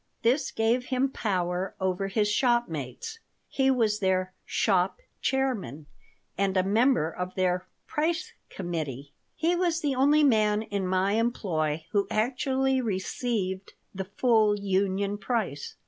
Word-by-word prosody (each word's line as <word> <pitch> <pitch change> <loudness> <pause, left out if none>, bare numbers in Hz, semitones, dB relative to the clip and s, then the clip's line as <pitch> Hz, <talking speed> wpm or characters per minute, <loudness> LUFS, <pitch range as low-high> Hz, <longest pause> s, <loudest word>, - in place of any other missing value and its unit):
This 250 +6 +2
gave 230 +3 +1
him 260 +1 0
power 185 -5 -1
over 190 0 -1
his 210 +2 +1
shopmates. 240 - -1 0.3
He 265 -1 +1
was 225 -5 +2
their 185 -1 0
"shop 185 -3 +1 0.2
chairman" 220 - -1 0.5
and 195 -1 +1
a 185 - +4
member 215 - +2
of 180 +2 -5
their 185 -1 0 0.2
"price 325 +2 -1 0.2
committee." 150 -7 -5 0.2
He 340 +2 +1
was 345 -2 +1
the 290 -3 0
only 290 +4 +4
man 215 -5 +3
in 200 -3 -2
my 185 +1 +1
employ 170 -9 0
who 200 -2 +1
actually 265 +3 +1
received 190 -1 -2 0.2
the 190 0 -4
full 215 0 +3
union 200 +1 0
price. 195 - -2
205 Hz, 130 wpm, -27 LUFS, 185-250 Hz, 0.5 s, a